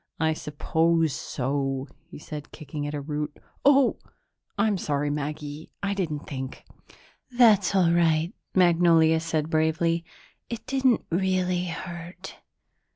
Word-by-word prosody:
"I 160 0 +2
suppose 160 +1 +1
so," 135 +1 -2 0.2
he - - -10
said, 150 -1 -8
kicking 145 -1 -6
at 150 - -4
a 145 - -3
root. 150 +1 -4 0.3
"Oh, 275 -1 +5 0.6
I'm 205 -1 +2
sorry, 145 -1 -1
Maggie; 150 +1 -5
I 200 0 0
didn't 155 -7 -3
think." 130 -1 -6 0.6
"That's 220 -7 +4
all 180 -3 +4
right," 165 -1 +2 0.2
Magnolia 165 -3 +5
said 160 -1 -2
bravely. 165 +1 +1 0.5
"It 235 -1 -6
didn't 265 -3 +2
really 180 0 +1
hurt. 175 +1 -7
165 Hz, 120 wpm, -26 LUFS, 150-180 Hz, 0.6 s, Oh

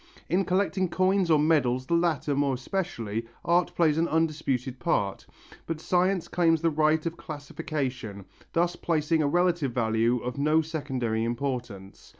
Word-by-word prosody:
In 185 +2 +2
collecting 190 0 +1
coins 185 0 +2
or 155 - +6
medals, 135 -5 +2
the 170 - -2
latter 165 -4 +1
more 140 -1 +1
especially, 120 - -3 0.2
art 175 +1 +2
plays 160 -2 +3
an 165 - +2
undisputed 145 -6 -1
part, 100 - -1 0.4
but 165 -1 -3
science 180 +2 +1
claims 165 -2 +2
the 165 - +3
right 155 +1 +2
of 165 0 -3
classification, 140 - -5 0.3
thus 175 +1 +1
placing 160 -1 0
a 145 - +2
relative 175 -4 +1
value 115 0 +1
of 125 +3 -5
no 155 +3 +3
secondary 130 -8 -2
importance. 120 -5 -4
155 Hz, 150 wpm, -27 LUFS, 125-170 Hz, 0.4 s, or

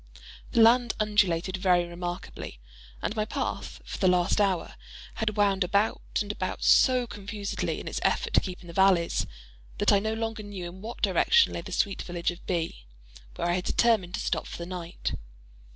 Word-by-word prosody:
The 230 - +5
land 240 +1 +5
undulated 190 -4 +1
very 180 -2 +3
remarkably; 175 - -6 0.4
and 215 - -1
my 215 - +1
path, 215 - -4
for - - -6
the 190 - +3
last 180 +3 +3
hour, 190 -4 0 0.5
had 215 -1 -1
wound 200 -2 +3
about 200 +4 +1 0.2
and 205 - -4
about 185 -3 -4
so 255 -1 +5
confusedly, 205 -1 -4
in - - -8
its - - -3
effort - - 0
to - - +6
keep 185 -2 -6
in 175 - -13
the 170 - -9
valleys, 190 -2 +3 0.5
that - - +3
I 200 - +5
no 220 +2 -2
longer 225 -1 -3
knew 200 -4 -7
in 180 +2 -10
what 225 +3 -8
direction 470 0 +4
lay - - -3
the - - -10
sweet 200 -2 0
village 175 -1 -2
of 175 - -12
B——, 165 - -3 0.5
where - - -2
I 175 - +2
had 180 0 -1
determined 210 -7 +2
to - - -4
stop - - -1
for - - -7
the 170 - -5
night. 175 -1 -5
195 Hz, 190 wpm, -27 LUFS, 175-215 Hz, 0.5 s, to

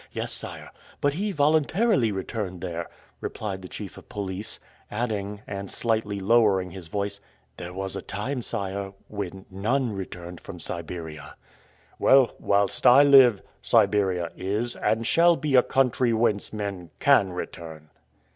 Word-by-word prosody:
"Yes, - - -3
sire; - - -6 0.3
but 145 0 +1
he 200 +6 -2
voluntarily 155 - +2
returned 95 -2 -4
there," 85 -2 -4 0.3
replied 100 -3 -5
the 90 - -8
chief 100 -2 -8
of - - -20
police, 100 0 -5 0.3
adding, 105 -2 -3
and 100 -1 -6
slightly 110 -3 -1
lowering 100 -3 +3
his 90 -2 -9
voice, 100 +2 -3 0.4
"there 85 - -7
was 95 +1 -5
a - - -4
time, 125 +6 -4
sire, 100 -3 -4 0.2
when 95 -2 -6
NONE 115 +6 0
returned 90 -3 -7
from - - -9
Siberia." 80 -3 -6 0.6
"Well, 135 -2 +5
whilst 100 +4 +2
I 130 +3 +9
live, 130 -7 +7 0.2
Siberia 100 -6 +2
is 105 +6 -2
and 115 +1 0
shall 170 +7 +5
be 155 -3 -2
a 125 - +8
country 125 -2 +2
whence 110 -3 +1
men 100 -5 -5
CAN 115 -10 +4
return." 80 -3 -7
100 Hz, 140 wpm, -26 LUFS, 95-120 Hz, 0.6 s, I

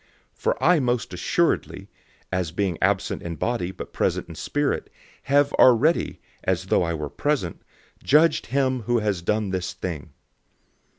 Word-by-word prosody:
005:003 - - -35
For - - 0
I 175 0 +5
most 120 -7 -1
certainly, 90 - 0 0.4
as 90 -3 -1
being 90 -1 -1
absent 95 -1 +1
in 85 -1 -5
body 105 +1 -1
but 95 - -9
present - - 0
in - - -7
spirit, 145 0 -2 0.4
have 145 +1 +3
already, 130 +7 +4 0.2
as - - 0
though - - +2
I 85 -1 -1
were 75 -1 -4
present, 125 - -2 0.4
judged 155 +4 +4
him 130 0 0
who 120 - +3
has 105 -5 -1
done 105 +2 0
this 95 -1 -2
thing. 85 -6 -5
105 Hz, 155 wpm, -24 LUFS, 90-135 Hz, 0.4 s, I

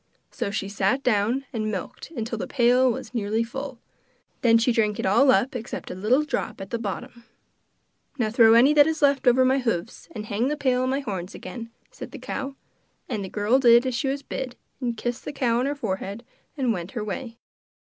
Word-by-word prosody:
So - - -3
she 200 -1 -3
sat 200 +6 0
down 235 +4 +1
and 215 -2 -1
milked 195 - -6
till 230 0 -4
the - - -3
pail 250 0 +4
was 225 0 -6
nearly 220 0 0
full. 265 +2 -6 0.6
Then 230 -2 +5
she 230 +2 +2
drank 215 -3 +1
it - - -1
all 235 +9 +4
up 250 +2 +3
except 235 -1 -5
a - - -4
little 220 +10 +2
drop 300 - -3
at 195 0 -8
the 235 - -1
bottom. 235 +3 -6 0.9
'Now 220 -5 0
throw 225 -1 +6
any 260 +6 +6
that 295 0 +6
is 320 -2 -1
left 280 -2 +3
over 255 +1 +6
my 265 +1 +3
hoofs, 230 - -3
and 210 - -5
hang 215 +4 0
the 300 +1 -1
pail 255 -3 +1
on 255 - 0
my 270 +2 0
horns 195 -6 -5
again,' 230 -2 -8 0.2
said - - -9
the - - -9
cow. 275 0 -5 0.5
And 215 -5 -3
the 190 - -6
girl 210 +7 +2
did 240 -1 +6
as 260 - -1
she 245 +3 -1
was 275 +1 -2
bid, 255 -2 -5 0.2
and 240 -3 -2
kissed 240 +2 -3
the - - -5
cow 240 -4 +1
on 255 - 0
her 285 - -1
forehead 200 -2 -4 0.3
and 255 -4 +1
went 180 -1 -6
her 225 - -3
way. 230 +3 -5
235 Hz, 215 wpm, -25 LUFS, 215-260 Hz, 0.9 s, throw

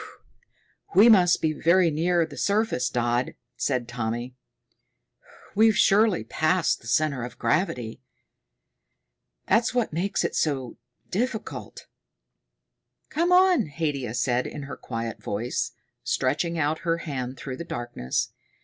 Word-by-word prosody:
"We 215 +5 +8
must 180 -5 +5
be 155 -1 +2
very 170 +2 +3
near 170 +2 +2
the 155 -3 -11
surface, 200 - 0
Dodd," 120 0 0 0.2
said 125 -4 -1
Tommy. 120 +1 -4 1.2
"We've 220 0 +4
surely 205 -2 +4
passed 160 +1 +1
the 115 - -13
center 140 0 +1
of 125 - -7
gravity. 125 - -1 1.5
That's 230 +4 +2
what 240 -9 0
makes 185 +5 -1
it - - -1
so 135 -5 -1 0.3
difficult." 225 +2 -4 1.3
"Come 340 +3 +1
on," 360 - +5
Haidia 140 -6 -3
said 125 0 0
in 145 - -7
her 140 - -7
quiet 115 -2 -5
voice, 115 +5 -2 0.3
stretching 155 +6 0
out 155 0 0
her 165 -2 0
hand 130 -4 -4
through 130 -2 -6
the - - -5
darkness. 120 - -3
155 Hz, 120 wpm, -25 LUFS, 125-185 Hz, 1.5 s, We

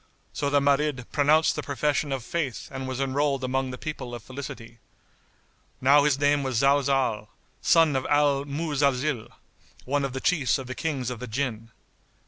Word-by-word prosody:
So 140 - -1
the 145 0 +3
Marid 140 -2 +1
pronounced 150 +2 +3
the - - -2
profession 145 0 -1
of 135 -3 -2
Faith 145 -3 -3
and 130 -1 -5
was 130 0 -4
enrolled 135 0 0
among 130 +1 -1
the 125 - -6
people 125 -4 -6
of 120 - -9
felicity. 130 -3 -9 1.0
Now 140 +2 +5
his 145 -3 +3
name 145 0 +2
was 130 -4 -1
Zalzál, 135 -5 +2 0.3
son 165 -4 +4
of 130 - -1
Al 145 -1 +3
Muzalzil,[FN#70] 140 -4 0 0.6
one 140 +2 0
of 135 -2 -3
the 130 - -3
Chiefs 145 -4 +1
of 135 - -7
the 130 - -5
Kings 135 -5 -3
of 125 - -6
the 125 - -6
Jinn. 115 -2 -3
140 Hz, 170 wpm, -26 LUFS, 130-145 Hz, 1.0 s, Now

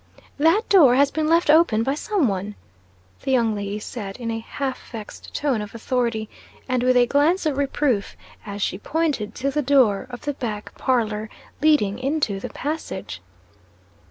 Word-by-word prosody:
"That 330 +9 +3
door 295 -11 +6
has 280 +1 +4
been 310 -1 -1
left 330 -1 +4
open 300 -9 +4
by 270 - 0
some 345 - 0
one," 200 +1 -3 0.7
the - - -5
young 235 -4 +3
lady 205 0 -3
said, 210 -2 -6
in 235 -2 -4
a 225 - -2
half 265 +3 -5
vexed 220 -3 -9
tone 270 -7 0
of 210 +2 -8
authority, 230 -2 -1 0.4
and 255 -1 0
with 255 0 +3
a 245 - +6
glance 300 +8 +2
of 300 -3 +1
reproof, 275 -6 0 0.3
as 200 -1 -4
she 185 - -2
pointed 295 -7 -1
to 275 +2 -1
the 300 - 0
door 255 -6 +3
of 245 -1 -8
the 290 - -2
back 220 -6 -5
parlor 220 -4 0 0.3
leading 265 -9 +3
into 270 -7 -1
the - - -6
passage. 110 - -5
255 Hz, 170 wpm, -23 LUFS, 215-290 Hz, 0.7 s, door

